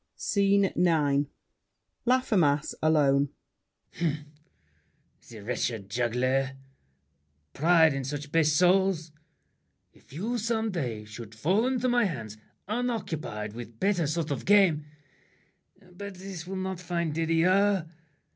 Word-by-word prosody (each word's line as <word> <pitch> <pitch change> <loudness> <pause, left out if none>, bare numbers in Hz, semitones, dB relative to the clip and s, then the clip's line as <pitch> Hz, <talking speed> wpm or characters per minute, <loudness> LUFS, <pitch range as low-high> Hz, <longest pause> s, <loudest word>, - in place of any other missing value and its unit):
SCENE 200 -1 +2
IX 150 -5 +2 0.8
LAFFEMAS 185 - +2
(alone). 145 -3 +3 0.7
Humph! 155 -3 -1 1.0
The 110 -3 -10
wretched 110 -3 -3
juggler! 130 +3 0 1.0
Pride 160 -1 +4
in 135 0 -3
such 145 +2 -5
base 160 -1 +3
souls! 180 0 +3 0.8
If - - -23
you 220 - -2
some 225 0 -1
day 120 - -3
should 110 0 -10
fall 190 - +1
into 255 -1 0
my 245 -2 +3
hands 115 - -5 0.3
Unoccupied 180 - -3
with 115 -1 -9
better 190 -6 +1
sort 155 0 -2
of 140 - -3
game— 190 -7 +4 1.1
But 200 +2 -8
this 180 -2 -8
will 195 - -5
not 190 -1 -3
find 170 -2 -2
Didier! 170 +3 +2
165 Hz, 110 wpm, -28 LUFS, 140-195 Hz, 1.1 s, Pride